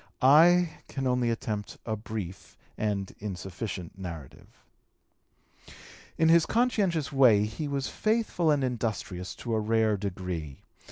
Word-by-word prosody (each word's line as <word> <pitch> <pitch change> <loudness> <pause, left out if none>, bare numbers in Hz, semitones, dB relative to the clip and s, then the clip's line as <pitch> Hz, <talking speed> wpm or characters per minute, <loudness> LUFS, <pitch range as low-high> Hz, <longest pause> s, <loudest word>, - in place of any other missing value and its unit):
I 165 +5 +6
can 135 -1 -4
only 125 -2 +1
attempt 110 -2 -3
a 110 - -1
brief 105 -4 -7 0.2
and 100 -3 -2
insufficient 95 -2 -6
narrative. 85 -7 -8 1.7
In 160 - +3
his 165 0 +5
conscientious 205 - +1
way 120 -7 +5
he 130 +8 -4
was 140 -1 -2
faithful 215 -6 0
and 145 -3 +2
industrious 110 -7 -3
to 120 - -4
a 110 - +2
rare 110 -1 +2
degree. 90 -7 -5
110 Hz, 120 wpm, -28 LUFS, 100-150 Hz, 1.7 s, I